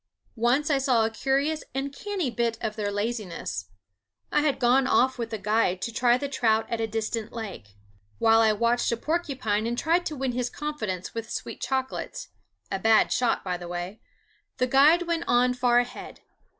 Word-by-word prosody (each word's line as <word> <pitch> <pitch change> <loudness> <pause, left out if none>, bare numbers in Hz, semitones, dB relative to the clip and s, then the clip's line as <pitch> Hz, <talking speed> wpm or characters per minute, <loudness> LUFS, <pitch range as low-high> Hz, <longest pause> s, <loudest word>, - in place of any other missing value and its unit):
Once 265 +6 +2
I 280 - +3
saw 250 -5 +3
a 225 - -1
curious 275 +7 0
and 275 +1 -2
canny 375 -4 -3
bit 235 -1 -1
of 215 -1 -3
their 205 -2 -2
laziness. 205 - -3 0.7
I - - +3
had 295 -2 +1
gone 255 +1 +3
off 260 0 +3
with 230 -1 -3
a 220 - -2
guide 210 -2 +1
to 230 - -3
try 240 +1 +3
the 280 - -3
trout 225 -5 +1
at 230 -1 -1
a 225 - 0
distant 220 0 -3
lake. 195 - -7 0.4
While 225 - +5
I 220 -1 +5
watched 235 +4 +1
a 235 - 0
porcupine 255 -9 -1
and 240 +1 -2
tried 340 +6 +1
to 310 - -4
win 265 -2 -1
his 245 0 -2
confidence 220 - -4
with 230 0 -5
sweet - - -5
chocolate 265 - -3 0.5
a 195 - -1
bad 220 +2 +4
shot, 245 -2 +1
by 180 -2 -2
the 175 0 -8
way 175 +4 -5 0.6
the 255 - +2
guide 290 +7 +5
went 335 -1 -2
on 250 +1 +3
far 245 -1 +2
ahead. 245 0 -3
240 Hz, 190 wpm, -26 LUFS, 220-270 Hz, 0.7 s, While